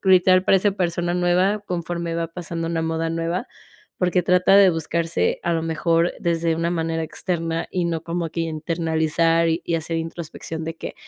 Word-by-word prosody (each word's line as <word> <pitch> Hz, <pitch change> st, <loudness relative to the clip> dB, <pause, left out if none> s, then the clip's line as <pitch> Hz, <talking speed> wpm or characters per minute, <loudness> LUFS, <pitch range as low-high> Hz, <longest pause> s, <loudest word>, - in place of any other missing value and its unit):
gritar 185 Hz, -1 st, +5 dB
para 195 Hz, -, +5 dB
esa 205 Hz, +2 st, +2 dB
persona 175 Hz, -2 st, -1 dB
nueva, 180 Hz, +3 st, +2 dB
conforme 170 Hz, -3 st, -4 dB
va 165 Hz, 0 st, -2 dB
pasando 165 Hz, -1 st, -4 dB
una 165 Hz, -1 st, -1 dB
moda 165 Hz, 0 st, -1 dB
nueva. 165 Hz, +7 st, -2 dB, 0.5 s
Porque 180 Hz, 0 st, +2 dB
trata 180 Hz, +2 st, +4 dB
de 195 Hz, -2 st, +7 dB
buscarse 165 Hz, 0 st, -1 dB
a 170 Hz, -, 0 dB
lo 165 Hz, -1 st, 0 dB
mejor 165 Hz, +1 st, +1 dB
desde 165 Hz, -1 st, +1 dB
una 170 Hz, +1 st, 0 dB
manera 165 Hz, -1 st, -1 dB
externa, 165 Hz, 0 st, -3 dB
y 180 Hz, -2 st, -1 dB
no 165 Hz, -2 st, -2 dB
como 170 Hz, 0 st, -3 dB
que 165 Hz, -, -3 dB
internalizar, 165 Hz, 0 st, +1 dB
y 165 Hz, +1 st, -1 dB
hacer 165 Hz, 0 st, -2 dB
introspección 165 Hz, 0 st, -6 dB
de 165 Hz, +1 st, -4 dB
que: -, -, -7 dB
165 Hz, 175 wpm, -22 LUFS, 165-175 Hz, 0.5 s, de